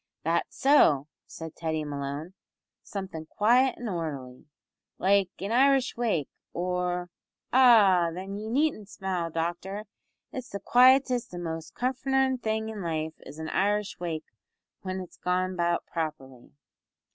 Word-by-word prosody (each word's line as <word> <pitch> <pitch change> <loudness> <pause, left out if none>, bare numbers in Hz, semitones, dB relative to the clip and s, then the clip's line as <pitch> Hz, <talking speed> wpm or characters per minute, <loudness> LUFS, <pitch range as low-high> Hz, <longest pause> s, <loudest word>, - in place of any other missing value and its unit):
"That's - - -1
so," 160 - +5 0.2
said 160 -1 -8
Teddy 160 -2 -2
Malone, 145 +4 -5 0.5
"somethin' 190 -6 -6
quiet 245 +7 +3
an' 240 - -5
orderly, 150 -8 -5 0.5
like 195 0 +3
an 195 +3 -3
Irish 265 +1 +4
wake, 220 - 0 0.3
or. 180 0 -2 0.4
Ah! 210 -9 +6
then 190 +3 -6
ye 215 +2 -5
needn't 255 -5 0
smile, 185 -4 -3
doctor. 175 +5 -3 0.5
It's 255 -2 -6
the 200 - -5
quietest 250 -1 +4
an' 175 - -5
most 160 -1 -5
comfortin' 265 +1 +1
thing 220 -1 -1
in 215 -2 -6
life 160 -2 -2
is 145 - -11
an 160 0 -5
Irish 205 +1 0
wake 165 -3 -3 0.6
whin 185 0 -4
it's 180 - -11
gone 185 +1 0
about 170 -1 0
properly." 145 -6 -5
185 Hz, 135 wpm, -28 LUFS, 165-225 Hz, 0.6 s, Ah